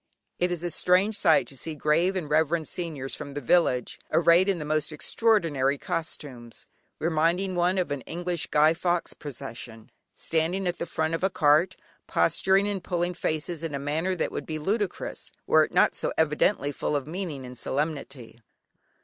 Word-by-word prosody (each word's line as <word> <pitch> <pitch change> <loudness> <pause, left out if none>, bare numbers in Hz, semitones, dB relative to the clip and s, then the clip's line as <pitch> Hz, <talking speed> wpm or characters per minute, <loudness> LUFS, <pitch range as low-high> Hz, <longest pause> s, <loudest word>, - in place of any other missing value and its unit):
It 180 - +2
is 175 -1 -3
a 175 - -2
strange 185 +6 +2
sight 165 -10 +4
to 135 - -11
see 155 +5 -3
"grave 165 +6 +2
and 180 -5 -2
reverend 160 +1 +1
seigneurs" 155 -7 -4
from 145 -2 -7
the - - -2
village, 130 -3 +1
arrayed 170 +3 +5
in 195 - +1
the 150 - -5
most 155 +1 0
extraordinary 155 -6 +1
costumes, 135 -7 -5 0.3
reminding 170 +4 +1
one 180 +1 +1
of 180 -5 -1
an 145 -2 -2
English 175 +1 -3
Guy 155 +2 +4
Fawkes 175 +1 -1
procession, 115 -5 -9 0.2
standing 165 +4 -1
at 175 -1 -2
the 170 - -3
front 160 0 -1
of 165 - -2
a 190 - +3
cart, 155 +2 +3 0.3
posturing 195 +1 +3
and 200 -3 -3
pulling 175 -1 -1
faces, 160 0 -2
in 165 -3 -3
a - - -3
manner 160 +6 -1
that - - -2
would - - -5
be 155 - -3
ludicrous, 200 +5 -3
were - - +5
it - - -13
not - - +3
so - - -1
evidently 150 0 +2
full 145 - -2
of 140 -2 -1
meaning 155 -5 -5
and 125 0 -9
solemnity. 140 -4 -4
160 Hz, 175 wpm, -26 LUFS, 145-180 Hz, 0.3 s, arrayed